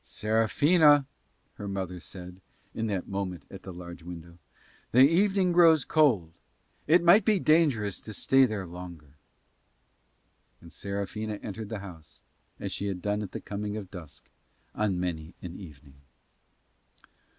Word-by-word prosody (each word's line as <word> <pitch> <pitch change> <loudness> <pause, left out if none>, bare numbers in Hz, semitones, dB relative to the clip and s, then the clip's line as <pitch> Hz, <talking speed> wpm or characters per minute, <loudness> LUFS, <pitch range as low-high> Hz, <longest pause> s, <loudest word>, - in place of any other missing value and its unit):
"Serafina," 145 +7 +3 0.5
her 105 - -6
mother 95 -2 -4
said 90 +1 -10 0.3
in 115 - -2
that 100 -4 -3
moment 95 -3 -4
at 95 - -9
the 95 - -9
large 85 -1 -9
window, 85 0 -10 0.5
"the 130 +3 +8
evening 190 +2 +2
grows 165 -5 +5
cold. 115 - +2 0.5
It 170 +3 +5
might 175 +5 +7
be 210 -1 +3
dangerous 145 - +2
to 110 - -8
stay 135 +4 +4
there 105 -4 -4
longer." 85 -4 -10 1.5
And 85 - -14
Serafina 100 +2 -4
entered 105 0 -6
the 110 -3 -5
house, 80 -5 -13 0.4
as - - -4
she 100 - -3
had 95 -2 -3
done 105 0 0
at 100 - -6
the - - -5
coming 105 +1 -4
of 100 -4 -8
dusk 85 -6 -11 0.5
on 100 -4 -1
many 85 -2 -4
an 90 -1 -7
evening. 70 -6 -14
100 Hz, 140 wpm, -28 LUFS, 90-130 Hz, 1.5 s, the